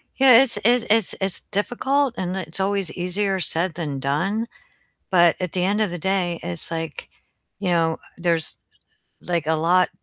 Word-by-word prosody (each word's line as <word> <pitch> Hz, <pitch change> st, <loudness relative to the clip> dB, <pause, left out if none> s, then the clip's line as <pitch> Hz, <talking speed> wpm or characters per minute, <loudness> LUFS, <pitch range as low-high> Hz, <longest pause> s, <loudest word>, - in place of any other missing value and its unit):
Yeah, 260 Hz, -2 st, +7 dB
it's 270 Hz, -3 st, 0 dB
it's 240 Hz, 0 st, +4 dB
it's 220 Hz, -2 st, +3 dB
it's 190 Hz, -1 st, 0 dB
difficult 260 Hz, +5 st, 0 dB
and 185 Hz, 0 st, -3 dB
it's 180 Hz, -1 st, -5 dB
always 195 Hz, -3 st, 0 dB
easier 190 Hz, +2 st, -1 dB
said 170 Hz, +1 st, +2 dB
than 150 Hz, -5 st, -4 dB
done, 175 Hz, -, -1 dB, 0.6 s
but 175 Hz, -3 st, +4 dB
at 180 Hz, -3 st, -3 dB
the 180 Hz, -, -1 dB
end 205 Hz, +3 st, +1 dB
of 215 Hz, -, +1 dB
the 175 Hz, -, -4 dB
day, 180 Hz, -1 st, -1 dB
it's 90 Hz, -, -1 dB
like, 165 Hz, -2 st, -5 dB, 0.5 s
you 195 Hz, -2 st, -2 dB
know, 165 Hz, -2 st, +1 dB, 0.2 s
there's, 170 Hz, -2 st, -1 dB, 0.6 s
like, 170 Hz, -3 st, -2 dB
a 160 Hz, -, +2 dB
lot 175 Hz, +3 st, +2 dB
180 Hz, 170 wpm, -22 LUFS, 165-205 Hz, 0.6 s, Yeah